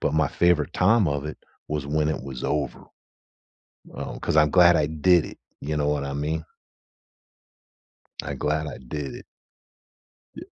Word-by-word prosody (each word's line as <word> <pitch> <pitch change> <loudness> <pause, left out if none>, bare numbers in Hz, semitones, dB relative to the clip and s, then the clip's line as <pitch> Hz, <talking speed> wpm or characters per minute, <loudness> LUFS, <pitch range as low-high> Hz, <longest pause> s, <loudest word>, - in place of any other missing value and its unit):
but - - 0
my 80 -3 +3
favorite 85 -5 +2
time 100 0 +3
of 70 -1 -2
it 75 - -7 0.3
was 75 -2 -3
when 75 +1 +1
it 80 - -2
was 65 -2 -7
over, 75 -2 -2 1.1
um, - - -6
'cause - - -1
I'm 75 -1 +5
glad 85 0 +6
I 75 - +2
did 80 +2 +3
it, - - -11 0.2
you 75 +2 -3
know 75 -1 +1
what 75 -1 0
I 70 - -4
mean? 75 +3 -2 1.8
I - - -5
glad 75 +1 -1
I 70 - -6
did 70 +2 -6
it. - - -11 1.1
Y - - -8
75 Hz, 165 wpm, -25 LUFS, 75-80 Hz, 1.8 s, glad